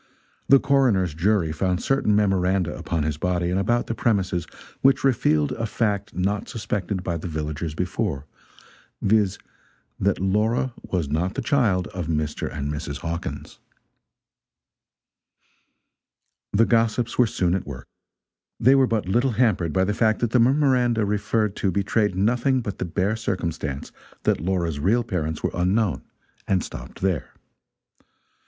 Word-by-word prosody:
The 135 - +9
coroner's 120 - +2
jury 85 0 +1
found 90 +3 0
certain 135 -6 +2
memoranda 95 -3 +1
upon 80 -3 -2
his 75 -1 -2
body 90 0 0
and 95 - +1
about 120 +5 +1
the - - -3
premises 95 -7 0 0.3
which 135 0 +4
revealed 80 - +2
a 115 - -2
fact 105 -4 -1
not 100 +3 -1
suspected 100 -4 -3
by 85 -2 -2
the 80 - -6
villagers 75 -1 -4
before 80 -5 -2 0.7
viz., 100 -2 +2 0.6
that 100 0 +1
Laura 110 +7 +1
was 85 -6 -2
not 85 +7 -1
the 135 - -2
child 110 -9 +2
of 90 -6 -5
Mr. 75 -2 -2
and 70 0 -3
Mrs. 75 -2 -5
Hawkins. 85 0 -5 2.9
The 110 +3 +4
gossips 115 +1 +1
were 125 - +6
soon 90 -4 0
at 95 - -2
work. 70 -3 -7 0.7
They 130 +4 +5
were 135 -1 +4
but 110 -5 -1
little 120 +6 +2
hampered 105 -8 +2
by 95 +4 +2
the 105 +2 0
fact 110 +1 +2
that 120 -2 0
the 125 - +4
memoranda 125 -3 +3
referred 105 0 0
to 100 - +1
betrayed 100 +1 +1
nothing 125 +6 +2
but 100 -4 -5
the - - -1
bare 95 +5 0
circumstance 85 -9 -3 0.3
that - - +1
Laura's 85 -4 -1
real 110 +10 +2
parents 80 -8 -3
were - - 0
unknown, 95 +2 +1 0.5
and 95 -2 +1
stopped - - -9
there. 95 -4 -1
95 Hz, 145 wpm, -24 LUFS, 85-115 Hz, 2.9 s, The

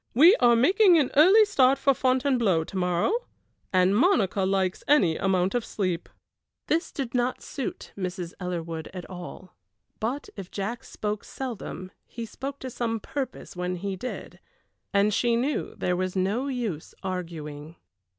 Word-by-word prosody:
"We 330 - +8
are 240 -1 +5
making 360 - +5
an 285 -5 +2
early 380 +9 +7
start 275 -9 +4
for 275 - +3
Fontainebleau 255 - +2
to 175 - -11
morrow, 180 - +1 0.6
and 185 +1 +4
Monica 210 - +3
likes 190 -1 0
any 190 - +4
amount 190 0 +1
of 245 -2 0
sleep." 185 -6 -2 0.6
This 330 +3 0
did 260 -4 -4
not 250 0 0
suit 270 - -5
Mrs. 180 -2 -4
Ellerwood 165 -3 -4
at 180 - -6
all; 180 0 -9 0.4
but 250 +6 -2
if 195 -3 -8
Jack 215 +4 -4
spoke 210 -1 -4
seldom 225 -7 -6 0.2
he 230 -1 -6
spoke 270 +5 -6
to 260 - -5
some 230 -2 -2
purpose 270 0 -5
when 180 0 -2
he 195 +2 -3
did, 250 +7 -7 0.5
and 205 +1 +3
she 235 +2 +2
knew 265 +5 -1
there 180 - 0
was 185 +1 -2
no 200 +8 0
use 230 - -4
arguing. 165 -4 -5
205 Hz, 150 wpm, -26 LUFS, 180-260 Hz, 0.6 s, We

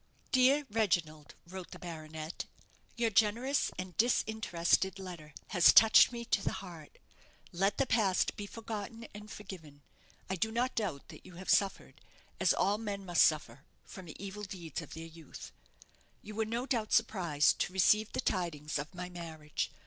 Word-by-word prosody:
"Dear 270 +3 +4
Reginald," 170 -9 0
wrote 185 +1 -8
the - - -10
baronet, 160 -1 -7 0.5
"_your 230 -2 +1
generous 230 +7 +2
and 185 -1 -6
disinterested 205 -5 +1
letter 175 -5 -9 0.2
has 175 - +7
touched 225 +2 +8
me 235 -1 -6
to 205 - +1
the - - -1
heart. 175 -5 -10 0.5
Let 195 +4 +1
the 275 - +2
past 215 -6 +2
be 205 - -6
forgotten 225 +1 -6
and 210 +1 -10
forgiven. 165 -10 -10 0.4
I 190 - -2
do 220 +5 0
not 245 +3 0
doubt 185 -11 -3
that - - -12
you 180 - -13
have 185 +2 -2
suffered, 195 -2 +1 0.4
as - - +4
all 205 +2 +1
men 200 -3 -4
must 175 -3 +4
suffer, 135 -4 +1 0.2
from 185 -2 -11
the 155 - -10
evil 200 +1 -7
deeds 180 -5 -6
of 165 - -10
their 165 0 -7
youth_. 165 -2 -11 0.7
"_You 215 - -8
were 220 +1 -1
no 235 +3 -2
doubt 230 -6 -1
surprised 175 -10 +2
to - - 0
receive 210 +3 +3
the - - -2
tidings 155 -6 -2
of 150 +5 -7
my 180 0 -5
marriage. 160 -4 -5
190 Hz, 165 wpm, -32 LUFS, 165-220 Hz, 0.7 s, touched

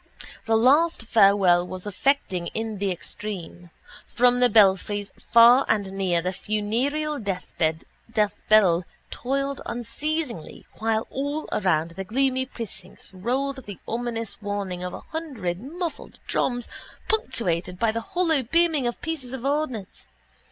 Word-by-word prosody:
The 225 0 +4
last 285 +5 +4
farewell 195 -5 +4
was 185 +1 -6
affecting 205 -4 0
in 220 -2 -3
the 200 0 0
extreme. 180 -1 -6 0.4
From 245 0 +3
the 250 0 +5
belfries 205 -1 +3 0.2
far 235 +3 +8
and 205 -3 +1
near 180 -4 0
the 185 +1 -1
funereal 250 +11 -1
deathbell 195 +1 +1 0.3
tolled 275 +2 -2
unceasingly 240 - -4
while 220 0 +1
all 285 +3 -3
around 165 -4 +1
the 190 +3 -5
gloomy 260 +5 0
precincts 195 -7 -9
rolled 260 +7 -2
the 200 -3 -7
ominous 230 -2 -4
warning 200 -3 -3
of 180 - -4
a - - -8
hundred 250 - -4
muffled 335 +6 -6
drums 245 -2 0 0.4
punctuated 180 - -1
by 225 +3 +2
the 230 +1 -3
hollow 330 0 +1
booming 310 +1 +2
of 240 - -3
pieces 300 -7 -4
of 265 -1 -5
ordnance. 275 -9 -2
225 Hz, 125 wpm, -25 LUFS, 195-270 Hz, 0.4 s, far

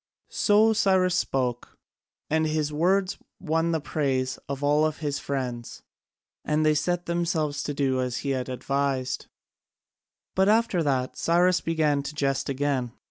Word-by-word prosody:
So 215 +1 +4
Cyrus 190 -4 +3
spoke, 125 -8 -2 0.5
and 160 +1 +1
his 155 -1 -1
words 185 +5 +1 0.2
won 165 -1 0
the 160 - +1
praise 135 -4 -1
of 140 0 -4
all 150 +2 +3
his 145 -2 -4
friends, 125 -5 -4 0.6
and 155 0 +1
they 155 - +4
set 175 +4 -1
themselves 165 -4 -1
to 145 0 -3
do 130 -2 +1
as 125 -1 -2
he 140 - +1
advised. 130 0 -2 1.1
But 190 +1 +3
after 220 -4 +3
that 130 -4 -1
Cyrus 175 0 +3
began 155 -3 +1
to 140 +2 -7
jest 135 -2 -1
again. 135 -3 -1
150 Hz, 135 wpm, -26 LUFS, 135-170 Hz, 1.1 s, So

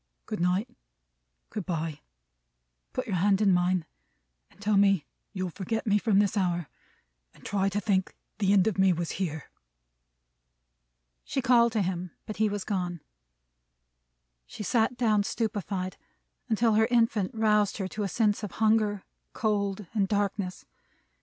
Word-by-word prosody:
Good 215 - -4
night. 180 +6 +1 0.8
Good 210 -4 -5
bye! 160 -4 -3 0.9
Put - - -3
your 185 - -1
hand 195 +2 +3
in 200 -3 +4
mine, 180 -1 +2 0.6
and - - -25
tell 205 +1 +1
me 195 -6 +4 0.3
you'll 185 -3 -3
forget 220 +5 -3
me 210 -1 +3
from 215 -2 +2
this 205 0 +3
hour, 175 -5 0 0.7
and - - -19
try 195 -1 +1
to 200 +1 -1
think 195 -3 0 0.2
the 195 -2 +2
end 200 -2 +5
of 215 -3 0
me 190 -1 +5
was 170 0 -3
here." 160 -4 -4 1.7
She - - -2
called 240 -2 +4
to 215 -3 +2
him; 180 0 -3 0.2
but 215 - -6
he 220 0 +2
was 205 -1 -3
gone. 180 -5 -3 1.5
She - - -7
sat 225 +4 +1
down 215 -4 +3
stupefied, 200 -4 -3 0.5
until 225 0 +3
her 220 +1 +4
infant 230 -5 +2
roused 210 -2 +2
her 195 -3 -2
to 215 - -5
a 200 - 0
sense 210 +2 +1
of 210 -4 -6
hunger, 215 -2 +2 0.3
cold, 205 -2 -1
and 200 -3 +1
darkness. 200 -2 -2
200 Hz, 150 wpm, -28 LUFS, 185-215 Hz, 1.7 s, end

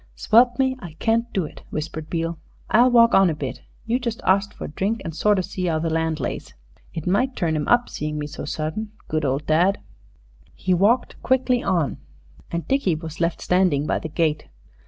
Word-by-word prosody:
"Swelp 240 +2 +4
me, 260 -1 +2
I 175 -5 -9
can't 230 +7 0
do 190 -4 0
it!" - - -11
whispered 155 0 -5
Beale. 165 -1 -2 0.3
"I'll 240 +3 +6
walk 235 -1 +6
on 195 -2 +6
a 160 - -1
bit. 140 -3 -5 0.2
You 235 +2 +1
just 235 -3 -3
arst 195 +2 +2
for - - -8
a - - -7
drink, 205 +8 -1
and 165 -2 -5
sort 210 +3 +3
of 185 - 0
see 180 -2 -3
'ow 160 - +1
the 160 +1 -1
land 160 -1 0
lays. - - -5 0.4
It 165 - -6
might 245 +8 +1
turn 165 -2 0
'im 150 -1 -2
up 240 0 +4
seeing 150 0 -4
me 150 - -3
so 145 - -7
sudden. 155 +9 -4
Good 155 -1 -1
old 135 +2 -1
dad!" 175 +6 +3 0.8
He 185 - 0
walked 205 +8 +2
quickly 255 -1 +2
on, 170 -8 0 0.5
and 170 -2 -3
Dickie 265 - +1
was 160 +1 -7
left 170 0 0
standing 180 -6 +2
by - - 0
the 160 - -6
gate. 155 -1 0
175 Hz, 205 wpm, -23 LUFS, 155-225 Hz, 0.8 s, I'll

